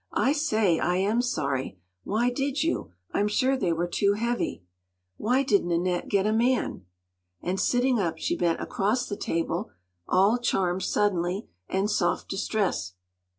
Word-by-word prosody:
“I 270 - +3
say, 220 - +2
I 180 - +1
am 205 +6 +2
sorry! 140 - -2 0.3
Why 235 +4 +1
did 275 +2 -1
you? 330 - -1 0.2
I’m 205 - +2
sure 260 +6 +2
they 190 -9 0
were 165 +1 0
too 200 +3 +2
heavy. 235 - -2 0.5
Why 250 +6 +2
didn’t 200 -8 +2
Annette 175 +1 0
get 200 -1 +2
a 215 - +2
man?” 235 - 0 0.6
And 185 +2 -1
sitting 250 -1 +2
up, 170 -4 -1
she - - -1
bent 170 -2 +1
across 225 +6 0
the 205 - -3
table, 170 +3 -2 0.4
all 200 +6 +4
charm 190 -6 0
suddenly, 190 0 0 0.2
and 190 +2 +1
soft 185 -4 0
distress. 195 - -1
200 Hz, 150 wpm, -27 LUFS, 175-240 Hz, 0.6 s, all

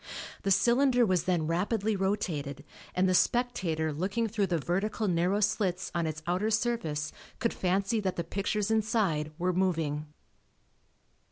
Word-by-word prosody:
The 195 - -1
cylinder 245 +4 +4
was 180 -4 +1
then 175 -4 +1
rapidly 200 +6 0
rotated 160 -8 -2 0.3
and 185 +1 +3
the 185 - +2
spectator 175 -8 +1
looking 195 +9 -1
through 205 -2 0
the 175 -2 +1
vertical 200 +7 -1
narrow 180 +3 +1
slits 190 -3 0
on 170 -2 0
its 155 +1 -5
outer 185 +5 0
surface, 215 -10 -1 0.2
could 230 - 0
fancy 195 +4 0
that 190 -3 -1
the 170 - -2
pictures 200 +4 -1
inside 210 -9 +1
were 180 +1 0
moving. 160 -5 0
185 Hz, 145 wpm, -29 LUFS, 165-215 Hz, 0.3 s, cylinder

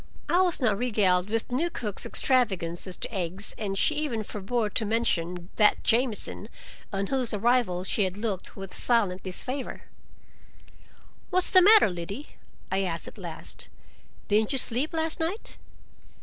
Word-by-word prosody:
I 355 - +4
was 360 -3 +2
not 220 -7 +1
regaled 200 -6 +2
with 225 +1 -1
the - - -8
new 335 +6 +1
cook's 210 - -5
extravagance 190 -10 0
as 185 - -5
to - - -2
eggs, 190 +1 -3
and 195 -3 -3
she 310 - +3
even 265 -8 -2
forbore 210 +2 -2
to - - +2
mention 180 -6 -1
"that 210 -1 +4
Jamieson," 225 -2 0 0.4
on 195 -1 -1
whose 250 -1 -1
arrival 215 -5 +1
she 200 +2 +1
had 185 +1 -4
looked 205 -4 -3
with 195 -1 -8
silent 205 -7 +1
disfavor. 255 +8 -5 1.5
"What's 370 -1 +4
the 370 - +8
matter, 425 +4 +7
Liddy?" 180 - -6 0.4
I 190 +1 +2
asked 170 -3 -2
at - - -11
last. - - -8 0.6
"Didn't 215 +5 +2
you - - +1
sleep 255 +4 +2
last 320 0 -2
night?" 345 +7 -3
215 Hz, 155 wpm, -27 LUFS, 190-255 Hz, 1.5 s, the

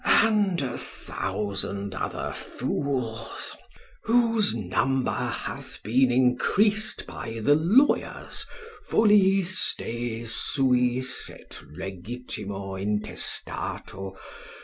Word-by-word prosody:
and 205 -5 +4
a 125 -2 -3
thousand 100 -1 -3
other 95 - -3
fools, 120 -5 -3 0.5
whose 230 - +4
number 125 +6 +1
hath - - -4
been 125 +4 +3
increased 200 - +2
by 115 0 -6
the 145 - +6
lawyers 190 - +2 0.4
ff. 195 -3 +4
de 115 0 -4
suis, 125 +1 +1
et - - -11 0.2
legit 95 +7 -5
l. 95 -1 -5
intestato. 95 -1 -2
125 Hz, 80 wpm, -26 LUFS, -, 0.5 s, the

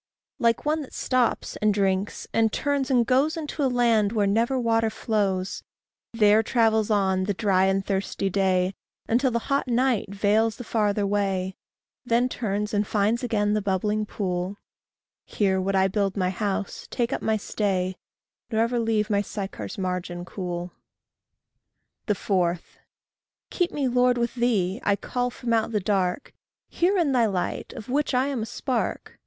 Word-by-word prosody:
Like 230 +2 +2
one 310 +1 +1
that 275 - -10
stops, 255 -2 0
and 215 0 +2
drinks, 195 -1 0
and 225 -1 +3
turns, 285 +1 -1
and 245 -3 +3
goes 275 +7 +2
Into 300 -1 -3
a 265 - +3
land 230 -4 +3
where 210 -3 +2
never 230 +6 +1
water 225 -2 +2
flows, 200 -4 -1 0.5
There 215 -1 +5
travels 225 -2 +2
on, 190 -3 +2
the 200 0 -1
dry 190 -2 +2
and 195 0 +1
thirsty 195 0 -1
day, 190 -1 +1 0.3
Until 255 +4 +2
the 235 - 0
hot 275 -1 0
night 245 -3 +1
veils 215 +2 +2
the 245 - -8
farther 210 -3 0
way, 195 -2 -1 0.5
Then 245 +1 +2
turns 210 -3 -2
and 205 0 +1
finds 215 +3 +1
again 210 -4 +1
the 215 - +1
bubbling 210 +2 0
pool 185 -1 -3 0.7
Here 190 -2 0
would 195 +1 -1
I 190 0 +4
build 195 0 -1
my 185 -1 +1
house, 200 0 -3
take 235 -1 -1
up - - -2
my 220 0 +1
stay, 190 -3 -1 0.5
Nor 220 -1 +1
ever 235 +1 0
leave 220 -2 0
my 200 -1 +3
Sychar's 195 - -6
margin 180 -2 -3
cool. 180 -2 -5 1.4
4. 180 -3 +1 0.9
Keep 355 -2 0
me, 280 -3 -1
Lord, 250 0 +3
with 235 -1 -1
thee. 225 -4 0
I 200 - +3
call 245 +4 -2
from 240 -1 -3
out 225 -1 +2
the 210 - +1
dark 190 +3 -1 0.4
Hear 375 +3 +1
in 330 -6 +2
thy 240 -4 +3
light, 185 -4 -3
of 215 - -9
which 280 +1 0
I 255 +1 +3
am 265 -5 -2
a 220 - -3
spark. 245 +1 -3
210 Hz, 165 wpm, -25 LUFS, 195-240 Hz, 1.4 s, There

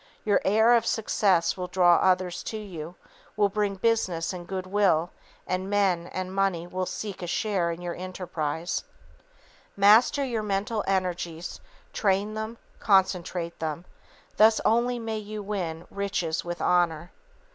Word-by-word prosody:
Your 205 -2 +3
air 220 +4 +4
of 235 - +4
success 195 -5 +2
will 180 -1 -4
draw 175 -1 +4
others 185 -1 +1
to 220 - -4
you, 175 -5 -7 0.4
will 205 -1 +3
bring 205 0 -1
business 190 -6 0
and 175 -1 -8
goodwill, 185 -3 +1 0.3
and 185 +1 -2
men 190 -4 +1
and 185 0 -5
money 195 -3 0
will 185 +1 -3
seek 205 -4 -5
a 175 - -4
share 185 -1 0
in 170 +1 -5
your 175 -1 -3
enterprises. 175 -3 -4 0.9
Master 225 +8 +5
your 235 -4 -2
mental 210 +2 -1
energies, 175 -3 -2 0.3
train 200 +1 +1
them, 220 +2 -5 0.2
concentrate 180 -4 +1
them, 160 +2 -4 0.5
thus 220 +1 +6
only 240 +2 +2
may 225 -2 -3
you 210 0 -6
win 175 -5 -4
riches 195 -5 -2
with 175 0 -5
honor. 175 -1 +1
190 Hz, 140 wpm, -26 LUFS, 175-210 Hz, 0.9 s, thus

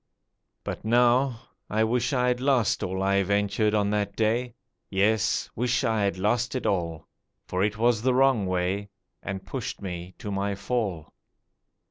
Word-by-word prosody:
But - - -5
now 120 +2 +3 0.3
I 110 +1 +2
wish 120 +5 +1
I 125 -2 +2
had 125 0 0
lost 130 -5 +2
all 95 +1 -2
I 100 0 +3
ventured 100 +2 +1
on 100 -1 +1
that 105 -1 -1
day— 115 +2 0 0.3
Yes, 105 +2 +1
wish 125 +2 0
I 110 -3 +1
had 100 -1 -1
lost 120 +6 0
it 130 - -3
all. 85 -5 -1 0.4
For 90 +1 -1
it 105 0 0
was 115 -1 +2
the 130 +1 +2
wrong 130 -7 +3
way, 95 +3 -1 0.3
And 95 -1 -5
pushed 115 +5 -5
me 90 -1 -6
to 105 - -6
my 100 0 -1
fall. 100 -6 -3
105 Hz, 160 wpm, -26 LUFS, 100-120 Hz, 0.4 s, now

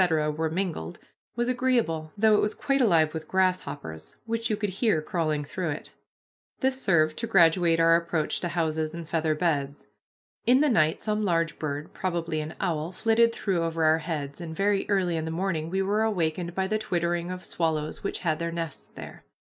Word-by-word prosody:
were 160 +1 -1
mingled, 165 - -3 0.4
was 240 0 0
agreeable, 240 -12 0
though 215 +1 +5
it 210 - +5
was 210 - 0
quite 275 -2 +1
alive 165 -9 +4
with 160 -1 -6
grasshoppers 180 - -1
which 230 0 -2
you 215 - 0
could 205 -2 -2
hear 200 -3 +1
crawling 155 -2 -1
through 170 +4 -3
it. 150 +1 -5 0.7
This 265 0 0
served 155 -5 +2
to 230 - -2
graduate 170 -3 +4
our 165 0 +6
approach 170 -2 0
to 175 - -2
houses 160 -2 -1
and 170 -2 -7
feather 160 -1 0
beds. 145 -4 -1 0.6
In 255 +2 +6
the 300 0 +3
night 155 -10 +3
some 215 0 -1
large 165 -4 0
bird, 145 -1 -4
probably 170 -4 -2
an 155 +1 -6
owl, 165 -3 -1
flitted 225 +4 +3
through 190 -6 -1
over 165 -1 -1
our 160 +1 +4
heads, 150 -2 -4
and 160 -2 -6
very 200 +2 +1
early 185 -4 +1
in 160 - -2
the - - -3
morning 165 -2 -2
we 190 +2 0
were 205 +3 +1
awakened 175 -5 -1
by 190 - +1
the 215 +3 0
twittering 175 -4 -1
of 185 0 -6
swallows 155 -2 -2
which - - -3
had 160 -3 0
their 170 0 -2
nests 165 -3 -5
there. - - -10
170 Hz, 190 wpm, -27 LUFS, 160-200 Hz, 0.7 s, our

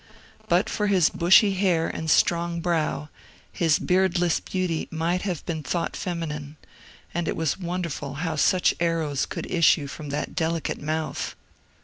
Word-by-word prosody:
But - - +3
for 210 - -1
his 185 -6 +4
bushy 190 +4 +5
hair 180 -4 +1
and 160 - -4
strong 170 +1 +2
brow, 155 -4 -1 0.4
his 165 -4 +2
beardless 180 -2 +2
beauty 180 -4 -2
might 170 +3 -1
have 180 -6 -3
been 160 -2 -3
thought 170 +2 -2
feminine; 155 -4 -4 0.6
and 170 -1 -2
it - - -1
was 160 +2 -1
won 180 0 -3
derful 145 -4 -5
how 160 +2 -2
such 180 +4 +3
arrows 165 -5 0
could - - -5
issue 165 -3 +4
from 145 +1 -7
that 145 - -3
delicate 165 -1 -2
mouth. 155 +1 -3
170 Hz, 150 wpm, -25 LUFS, 155-180 Hz, 0.6 s, bushy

